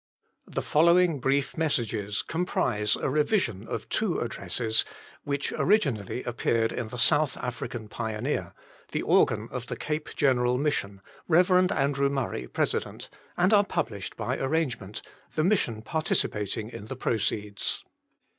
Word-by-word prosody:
The - - -3
following 170 0 +4
brief 135 +2 +1
messages 115 -10 -1
com 165 +3 -2
prise 105 - +1
a - - -2
revision 150 - +1
of - - -4
two - - 0
addresses, 110 -2 +1 0.4
which 140 0 -1
originally 135 - +1
appeared 115 -1 0
in 120 - -3
the 125 - -7
JSouth 145 +3 +4
African 120 -2 -5
Pioneer, 110 +5 -3 0.4
the - - 0
organ - - +3
of - - -5
the' - - -3
Cape 150 0 -3
Gen 135 -3 +3
eral 125 +1 +1
Mission" 100 -10 -1 0.3
(Rev. 180 +2 +4 0.2
Andrew 140 0 +1
Murray, 135 - -2
Pres.), - - 0 0.6
and 185 +4 +4
are 205 -1 +7
published 100 - -3
by 130 +2 -2
arrange 135 -3 0
ment, 100 +1 -8 0.3
the 155 - +2
Mission 140 - +1
participating 110 -7 -1
in 105 - -8
the 130 - -5
proceeds. 105 -4 -1
130 Hz, 140 wpm, -27 LUFS, 110-155 Hz, 0.6 s, are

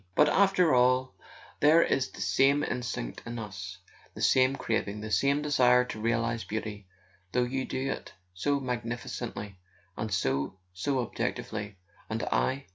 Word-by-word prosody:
But 150 0 +5
after 190 -5 +4
all 125 +1 +3 0.5
there 155 +3 +6
is 135 -1 0
the - - -10
same 135 +10 +3
instinct 120 - -3
in 120 +1 -6
us, 100 -4 -6 0.4
the - - -7
same 130 +1 +4
craving, 105 -4 -2
the 110 0 -6
same 140 +9 +2
desire 125 -4 +4
to 110 -3 -6
realize 115 0 0
Beauty, 105 -2 -5 0.5
though 125 - +3
you 130 +1 -2
do 130 +1 -2
it - - -6 0.2
so 140 +10 0
magnificently 115 -5 -4 0.4
and 110 0 -4
so—so 90 - -1
objectively, 105 -3 -4 0.3
and 110 +1 -2
I 135 -2 0
120 Hz, 140 wpm, -29 LUFS, 105-135 Hz, 0.5 s, there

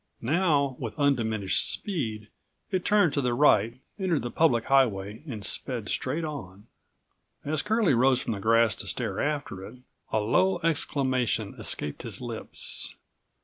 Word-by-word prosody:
Now, 145 -1 +2
with 110 -4 -5
undiminished 110 -8 +1
speed, 110 - -3 0.4
it 185 -2 0
turned 205 -7 +3
to 140 - +1
the 125 -2 0
right, 115 -4 +3 0.2
entered 175 - 0
the 120 - -4
public 120 -6 +2
highway 110 -5 +1
and 110 -7 -5
sped 120 -5 0
straight 150 +6 -1
on. 105 - -7 0.8
As 150 0 +1
Curlie 215 -7 +2
rose 130 +1 +4
from 115 - -2
the 100 - -5
grass 115 +1 +4
to - - -5
stare - - -2
after 145 -10 -2
it, 95 - -10 0.4
a 110 - +2
low 180 - +2
exclamation 135 -6 0
escaped 75 - -2
his - - -6
lips. - - -4
130 Hz, 145 wpm, -27 LUFS, 110-150 Hz, 0.8 s, rose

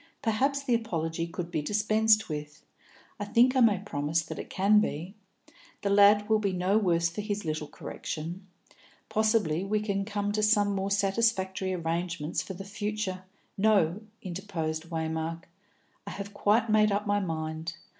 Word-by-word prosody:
Perhaps 270 +5 +1
the 255 - +1
apology 165 -7 -1
could 170 0 -6
be 160 -3 -1
dispensed 215 +4 +3
with; 150 -1 -7 0.5
I 205 - -2
think 245 +5 +4
I - - +4
may 225 -5 +5
promise 160 -4 -1
that - - -7
it - - -7
can 205 +2 +4
be. 175 -2 -2 0.7
The 200 - +1
lad 205 +1 +6
will 220 0 +3
be 200 -3 -1
no 185 +4 +2
worse 170 -4 +2
for 170 +5 -5
his 205 -2 -3
little 155 -1 -2
correction. 170 +7 -6 0.6
Possibly 215 -7 +1
we 210 +2 0
can 200 -2 -1
come 205 0 -2
to 215 +1 0
some 210 -1 +3
more 195 0 -1
satisfactory 195 -2 +1
arrangements 170 -2 -2
for 190 - -7
the 195 +2 -8
future 205 -2 -4 0.2
" - - -41
"No," 195 -2 +2 0.2
interposed 170 -4 -4
Waymark; 160 0 -3 0.6
"I - - -3
have 200 +1 -7
quite 215 +3 +2
made 215 -1 +4
up 205 +1 0
my 205 0 +2
mind. 160 -2 -4
195 Hz, 165 wpm, -28 LUFS, 165-210 Hz, 0.7 s, lad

